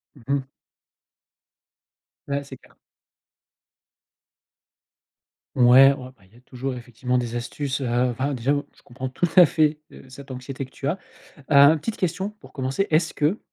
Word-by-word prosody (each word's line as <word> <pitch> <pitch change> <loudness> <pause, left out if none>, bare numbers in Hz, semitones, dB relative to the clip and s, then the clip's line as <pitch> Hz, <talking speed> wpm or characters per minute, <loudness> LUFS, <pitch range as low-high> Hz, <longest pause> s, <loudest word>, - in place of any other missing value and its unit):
Mmh 135 +1 -3
mh. 135 - -7 1.8
Ouais, 140 0 -1
c'est 140 -1 -10
clair. - - -24 2.8
Ouais, 130 +2 +7
ouais, 130 -2 -7
ben, 100 - -24
il 105 - -27
y - - -19
a - - -18
toujours, 130 +1 -5
effectivement, 125 +1 -3
des 120 -1 -2
astuces. 135 +3 -4
Heu, 135 - -2 0.2
enfin, 130 +4 -2
déjà, 130 +2 0
moi, 145 0 -1
je - - -23
comprends 130 +2 -7
tout 165 +7 -1
à 180 -2 +9
fait, 150 0 +1
heu, - - -13
cette 135 +1 -11
anxiété 130 +2 -6
que 130 - -15
tu 135 - -4
as. 170 +7 -1 0.5
Heu, - - +4
une 145 +3 +7
petite 220 +8 -4
question 190 +3 -2
pour 210 - -18
commencer: 135 +8 -2
«Est-ce 155 +1 +1
que 155 +8 +1
135 Hz, 170 wpm, -23 LUFS, 125-150 Hz, 2.8 s, à